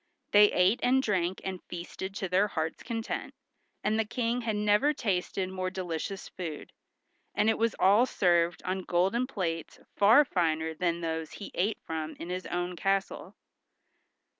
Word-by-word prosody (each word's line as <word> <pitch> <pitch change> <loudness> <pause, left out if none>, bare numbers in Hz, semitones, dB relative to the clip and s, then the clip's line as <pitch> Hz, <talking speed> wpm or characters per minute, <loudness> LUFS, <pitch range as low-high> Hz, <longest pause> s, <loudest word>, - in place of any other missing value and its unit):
They 205 0 +7
ate 190 +6 +3
and 260 +1 +3
drank 185 -4 0
and 190 -1 -4
feasted 185 +2 -6
to 195 - -2
their 185 +3 +3
hearts' 160 -5 -3
content, 225 -1 -4 0.5
and 215 +1 +1
the - - +3
King 235 +2 -1
had 225 -2 -1
never 210 +8 +3
tasted 190 -4 -1
more 185 0 -3
delicious 185 +1 -4
food, 165 -5 -7 0.6
and 210 +2 +3
it - - -1
was 230 -1 +1
all 205 +7 +5
served 175 -4 +2
on 190 0 -2
golden 190 +8 +1
plates 170 - -4 0.2
far 225 +9 +6
finer 160 -6 0
than 170 +1 -1
those 160 -1 -3
he 205 - -8
ate 205 +5 0
from 160 -1 -4
in 170 - -7
his 185 0 -4
own 175 0 -2
castle. 195 +2 -1
190 Hz, 160 wpm, -29 LUFS, 175-210 Hz, 0.6 s, They